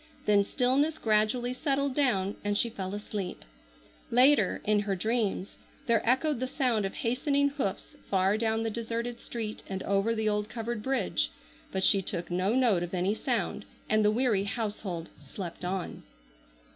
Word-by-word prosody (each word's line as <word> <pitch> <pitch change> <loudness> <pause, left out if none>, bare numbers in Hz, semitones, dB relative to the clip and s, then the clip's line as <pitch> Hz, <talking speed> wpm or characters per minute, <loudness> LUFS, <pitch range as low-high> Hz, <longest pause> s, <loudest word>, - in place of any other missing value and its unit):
Then 205 -1 +4
stillness 275 +8 +1
gradually 220 +2 +1
settled 275 0 0
down 205 -9 +1
and 205 0 +1
she 235 - +2
fell 195 -2 -4
asleep. 205 -3 -5 0.6
Later, 250 -4 +4
in 210 0 +3
her 200 -1 -1
dreams, 215 -1 -1 0.3
there 230 -4 +3
echoed 270 +1 +2
the 255 - -1
sound 250 -6 +1
of 195 - -4
hastening 280 +4 +1
hoofs 270 -9 -4
far 190 +1 +3
down 225 0 0
the 225 - -1
deserted 235 +1 -3
street 220 -2 -5
and 190 -1 -4
over 200 +3 +1
the 220 -1 -1
old 210 0 0
covered 230 0 -4
bridge, 265 +4 0 0.4
but 190 0 -1
she 195 +1 +6
took 175 -1 -3
no 185 +5 +1
note 235 -9 +3
of 175 +1 -3
any 185 +3 +1
sound, 215 -3 -1 0.2
and 215 0 +3
the 210 - +5
weary 215 -3 +2
household 205 -6 -3
slept 170 +5 -8
on. 180 0 -3
215 Hz, 160 wpm, -29 LUFS, 195-245 Hz, 0.6 s, she